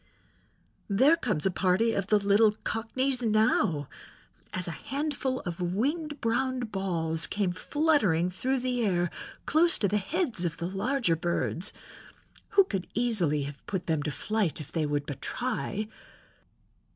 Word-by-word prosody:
There 265 Hz, +11 st, +5 dB
comes 215 Hz, -, -1 dB
a 190 Hz, -, +3 dB
party 190 Hz, +6 st, +2 dB
of 195 Hz, -1 st, -1 dB
the 210 Hz, -, +5 dB
little 205 Hz, +1 st, +4 dB
cockneys 250 Hz, +4 st, -1 dB
now," 215 Hz, -, +2 dB, 0.6 s
as 180 Hz, -1 st, -3 dB
a -, -, -2 dB
handful 275 Hz, -, -2 dB
of 175 Hz, -1 st, -5 dB
winged 285 Hz, -, -1 dB
brown 255 Hz, +2 st, 0 dB
balls 175 Hz, -7 st, -1 dB
came 200 Hz, -3 st, 0 dB
fluttering 195 Hz, -, +2 dB
through 255 Hz, +8 st, -1 dB
the 250 Hz, -1 st, 0 dB
air 175 Hz, -4 st, +1 dB, 0.3 s
close 335 Hz, +3 st, +4 dB
to 205 Hz, -, +2 dB
the 205 Hz, +2 st, +1 dB
heads 255 Hz, -, -1 dB
of 165 Hz, -2 st, -2 dB
the 170 Hz, -, -3 dB
larger 200 Hz, 0 st, +1 dB
birds, 170 Hz, +3 st, -1 dB, 0.9 s
who 395 Hz, -, +10 dB
could 195 Hz, -, -4 dB
easily 195 Hz, -11 st, +1 dB
have 140 Hz, 0 st, -8 dB
put 190 Hz, -3 st, -3 dB
them 160 Hz, -3 st, 0 dB
to 150 Hz, -, -2 dB
flight 195 Hz, +5 st, -1 dB
if 150 Hz, -, -9 dB
they 155 Hz, -3 st, 0 dB
would 145 Hz, -1 st, -1 dB
but 145 Hz, -2 st, -6 dB
try. 220 Hz, -4 st, -2 dB
205 Hz, 150 wpm, -28 LUFS, 175-255 Hz, 0.9 s, who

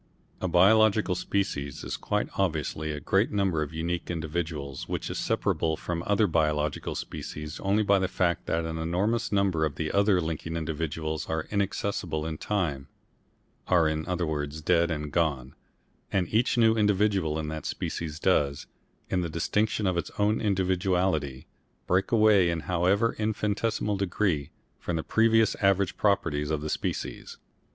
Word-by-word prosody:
A 95 Hz, -, 0 dB
biological 105 Hz, +3 st, +4 dB
species 90 Hz, -7 st, -2 dB
is -, -, -3 dB
quite -, -, -1 dB
obviously 80 Hz, -4 st, -1 dB
a 75 Hz, -, -4 dB
great 95 Hz, +9 st, +2 dB
number 95 Hz, -6 st, +1 dB
of 75 Hz, -, -3 dB
unique 85 Hz, +2 st, -3 dB
individuals 80 Hz, -4 st, -4 dB
which -, -, -3 dB
is -, -, -3 dB
separable 80 Hz, -1 st, 0 dB
from 85 Hz, -1 st, -4 dB
other 105 Hz, +1 st, +3 dB
biological 75 Hz, -4 st, 0 dB
species 75 Hz, 0 st, -6 dB
only 100 Hz, +2 st, +2 dB
by 100 Hz, -1 st, +4 dB
the 95 Hz, -, +1 dB
fact 90 Hz, -2 st, 0 dB
that 80 Hz, 0 st, 0 dB
an 80 Hz, 0 st, -4 dB
enormous 95 Hz, +8 st, 0 dB
number 100 Hz, -5 st, +2 dB
of 75 Hz, -3 st, -2 dB
other 100 Hz, +4 st, +2 dB
linking 80 Hz, 0 st, -3 dB
individuals 80 Hz, -1 st, -3 dB
are 80 Hz, -1 st, -1 dB
inaccessible 100 Hz, -5 st, -1 dB
in 80 Hz, -1 st, -4 dB
time 80 Hz, -10 st, -2 dB, 0.8 s
are 85 Hz, -3 st, +4 dB
in 80 Hz, 0 st, -2 dB
other 90 Hz, -1 st, -1 dB
words 75 Hz, -1 st, -3 dB
dead 85 Hz, +2 st, +2 dB
and 75 Hz, -2 st, -3 dB
gone 70 Hz, -6 st, 0 dB, 0.6 s
and 90 Hz, -3 st, +1 dB
each 115 Hz, +3 st, +2 dB
new 115 Hz, -1 st, +5 dB
individual 100 Hz, -6 st, +2 dB
in 80 Hz, -1 st, -3 dB
that 80 Hz, -1 st, -5 dB
species 80 Hz, -2 st, -4 dB
does, 70 Hz, -6 st, +1 dB, 0.4 s
in 95 Hz, -, 0 dB
the 85 Hz, -, -3 dB
distinction 105 Hz, +6 st, 0 dB
of 90 Hz, -2 st, +1 dB
its 85 Hz, -, -2 dB
own 105 Hz, +1 st, +2 dB
individuality, 90 Hz, -, 0 dB, 0.4 s
break 95 Hz, +2 st, +1 dB
away 105 Hz, -5 st, +5 dB
in 85 Hz, -1 st, -1 dB
however 95 Hz, +7 st, +1 dB
infinitesimal 105 Hz, -1 st, -1 dB
degree 90 Hz, -6 st, 0 dB, 0.3 s
from 85 Hz, -, -3 dB
the 80 Hz, -, -2 dB
previous 115 Hz, 0 st, +3 dB
average 100 Hz, -1 st, +2 dB
properties 75 Hz, -8 st, +1 dB
of 75 Hz, -2 st, -1 dB
the 75 Hz, -, -3 dB
species. -, -, -4 dB
85 Hz, 155 wpm, -27 LUFS, 80-100 Hz, 0.8 s, new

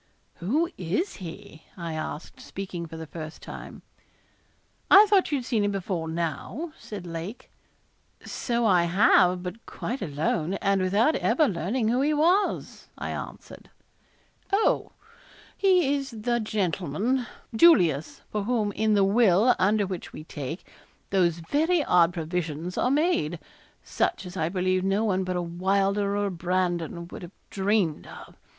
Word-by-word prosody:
'Who 275 Hz, -, +1 dB
is 190 Hz, -, -2 dB
he?' 180 Hz, -2 st, -9 dB, 0.2 s
I 170 Hz, -2 st, -5 dB
asked, 155 Hz, 0 st, -6 dB
speaking 185 Hz, -3 st, -6 dB
for 160 Hz, 0 st, -9 dB
the 160 Hz, -, -6 dB
first 155 Hz, 0 st, -8 dB
time. -, -, -9 dB, 1.1 s
'I 400 Hz, +3 st, +9 dB
thought 400 Hz, -5 st, +3 dB
you 290 Hz, -, +2 dB
had 250 Hz, -, -5 dB
seen 230 Hz, -5 st, +1 dB
him 205 Hz, -, +1 dB
before 185 Hz, -4 st, -3 dB
now,' 170 Hz, -, -3 dB
said 200 Hz, -4 st, -8 dB
Lake. 170 Hz, +7 st, -7 dB, 0.7 s
'So 235 Hz, -1 st, -1 dB
I 180 Hz, -5 st, +4 dB
have, 180 Hz, 0 st, +4 dB
but 185 Hz, +5 st, -7 dB
quite 255 Hz, +3 st, -5 dB
alone, 160 Hz, +2 st, -1 dB
and 195 Hz, -1 st, +1 dB
without 205 Hz, +11 st, +3 dB
ever 310 Hz, -3 st, +2 dB
learning 215 Hz, +5 st, -1 dB
who 245 Hz, +3 st, +2 dB
he 300 Hz, +2 st, +2 dB
was,' 350 Hz, +7 st, +1 dB
I -, -, -4 dB
answered. -, -, -8 dB, 0.8 s
'Oh! 400 Hz, +3 st, +1 dB, 0.6 s
He 365 Hz, -7 st, +3 dB
is 275 Hz, -1 st, -2 dB
the 240 Hz, +1 st, -1 dB
gentleman, 210 Hz, -, -1 dB, 0.3 s
Julius, 175 Hz, -, +4 dB
for 210 Hz, -1 st, -2 dB
whom 220 Hz, -3 st, 0 dB
in 215 Hz, +1 st, +1 dB
the 200 Hz, -, +4 dB
will, 210 Hz, +2 st, +4 dB
under 205 Hz, +2 st, +3 dB
which 185 Hz, -2 st, -6 dB
we 155 Hz, -, -8 dB
take, 155 Hz, +2 st, -6 dB, 0.5 s
those 175 Hz, -4 st, +2 dB
very 305 Hz, -, +1 dB
odd 175 Hz, -6 st, +4 dB
provisions 170 Hz, 0 st, -3 dB
are 250 Hz, -, +1 dB
made 280 Hz, -, +1 dB, 0.5 s
such -, -, -1 dB
as 180 Hz, 0 st, -8 dB
I 160 Hz, -3 st, 0 dB
believe 185 Hz, 0 st, 0 dB
no 195 Hz, +3 st, +1 dB
one 190 Hz, -3 st, +1 dB
but 185 Hz, 0 st, -3 dB
a 175 Hz, -, -1 dB
Wylder 195 Hz, +3 st, 0 dB
or 205 Hz, -, 0 dB
a 200 Hz, -, -1 dB
Brandon 175 Hz, -1 st, -2 dB
would -, -, -9 dB
have 175 Hz, +1 st, -11 dB
dreamed 195 Hz, -5 st, 0 dB
of. -, -, -12 dB
195 Hz, 150 wpm, -26 LUFS, 170-235 Hz, 1.1 s, I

